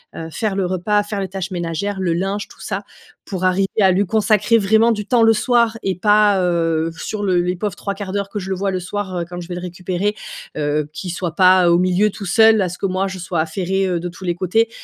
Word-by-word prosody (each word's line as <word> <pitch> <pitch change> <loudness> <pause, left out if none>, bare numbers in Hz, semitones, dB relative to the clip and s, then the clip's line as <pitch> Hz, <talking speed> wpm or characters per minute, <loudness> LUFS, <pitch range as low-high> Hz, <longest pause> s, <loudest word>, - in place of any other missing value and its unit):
heu, 165 0 -6
faire 210 -1 -2
le 195 - 0
repas, 190 +3 0
faire 205 0 -4
les 190 - -2
tâches 190 0 -5
ménagères, 180 +3 -3
le 175 -3 0
linge, 195 +4 -2
tout - - -18
ça, - - -4 0.4
pour 185 -2 -5
arriver 185 +1 +2
à 190 - +5
lui 195 +2 +2
consacrer 215 +2 +3
vraiment 220 +2 +3
du 210 -2 -2
temps 240 0 +3
le 225 0 +6
soir, 235 0 +2
et 190 -1 0
pas, 205 +1 +4
heu, 165 -2 0
sur 210 -1 -4
le 185 -3 +2
les 180 +1 -1
pauvres 200 +1 -3
3/4 200 -1 -5
d'heure 200 0 -2
que 205 - -4
je 190 0 -6
le 190 - -1
vois 195 +1 -1
le 185 - -2
soir, 190 0 -4
heu, 170 - -3
quand 175 0 -6
je 170 - -9
vais 175 - -5
le 180 - -5
récupérer. 180 +3 -3 0.4
Heu, 150 0 -1
qu'il 180 +2 -5
soit 170 -1 -4
pas 185 -1 +5
au 170 - +5
milieu 185 +3 +2
tout 200 - -8
seul 220 +2 +5
à 185 - 0
ce 180 - -7
que - - -3
moi, 190 0 0
je 190 -1 -6
sois 175 -1 -3
affairée, 190 +4 -1
heu, 175 -2 -1
de 175 - -4
tous 180 +2 -12
les 175 -1 0
côtés. 195 +6 +1
190 Hz, 255 wpm, -19 LUFS, 180-205 Hz, 0.4 s, le